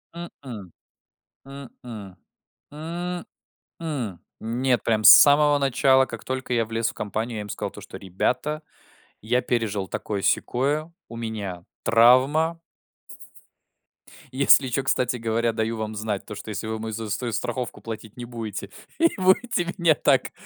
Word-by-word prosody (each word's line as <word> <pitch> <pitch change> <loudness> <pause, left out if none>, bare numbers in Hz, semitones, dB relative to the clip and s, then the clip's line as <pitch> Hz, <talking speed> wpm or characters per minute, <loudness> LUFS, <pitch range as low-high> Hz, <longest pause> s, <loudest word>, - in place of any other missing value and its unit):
М-м. 125 - -9 0.8
М-м. 120 -8 -10 0.6
М-м. 175 +3 -6 1.0
Нет, 120 +2 0
прям 110 -2 +1
с - - +10
самого 145 0 +7
начала. 135 -1 +3
Как 115 -3 -9
только 130 -1 -3
я 115 -2 +2
влез 115 +1 -1
в - - -9
компанию, 110 +3 -4
я 105 - -3
им 105 - -8
сказал - - -4
то, - - -11
что: - - -10
"Ребята, 125 - -2 0.6
я 125 +4 +1
пережил 105 -6 -1
такое-сякое, 135 - -1 0.2
у 115 - -9
меня 105 -6 -5 0.2
травма". 130 +9 +4 1.7
"Если 135 0 +5
чё, 135 - 0
кстати 125 -2 0
говоря, 115 0 0
даю 110 0 -2
вам 110 0 -4
знать, 105 -2 -3
то - - -8
что 100 - -9
если 105 0 -4
вы 110 0 -3
мою 110 0 -5
заю 110 -1 -5
ст 120 +3 -2
страховку 125 +2 -4
платить 110 -1 -8
не 120 - -6
будете, 115 -3 -6 0.3
и 335 0 +5
будете 185 0 +2
меня 170 -3 +4
так, - - +2
120 Hz, 140 wpm, -24 LUFS, 110-140 Hz, 1.7 s, с